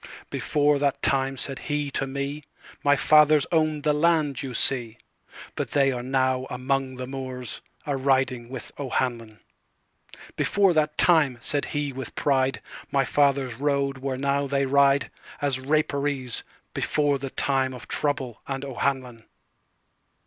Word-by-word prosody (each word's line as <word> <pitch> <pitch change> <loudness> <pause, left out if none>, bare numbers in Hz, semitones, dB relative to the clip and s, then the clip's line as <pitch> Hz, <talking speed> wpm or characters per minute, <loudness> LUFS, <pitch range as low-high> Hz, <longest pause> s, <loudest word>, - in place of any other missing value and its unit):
"Before 145 -1 +1
that 140 -1 +1
time," 135 0 +1
said 135 +1 -4
he 145 -1 -2
to 135 - -1
me,"My 140 +1 -2
fathers 150 +1 +5
owned 155 -3 +1
the 150 - +3
land 150 -3 +2
you 130 -3 -5
see; 120 -4 +2 0.6
But - - -3
they 140 -2 +3
are 125 -2 -3
now 130 0 0
among 130 +1 -1
the 125 0 -5
moorsA 130 -2 -5 0.2
riding 135 -3 0
with 130 -2 -7
O'Hanlon.""Before 130 - -3
that 150 -1 +1
time," 155 -8 +4
said 145 +4 -2
he 145 -2 -2
with 130 -2 -7
pride,"My 135 0 0
fathers 140 -2 +2
rode 140 -1 0
where 130 -1 -3
now 140 +1 0
they 140 0 +1
rideAs 140 0 +1
Rapparees, 140 -4 0 0.3
before 145 -2 +1
the 135 0 -5
timeOf 130 -2 -1
trouble 135 -6 -2
and 135 0 -4
O'Hanlon." 130 -3 -2
135 Hz, 125 wpm, -25 LUFS, 130-145 Hz, 0.6 s, fathers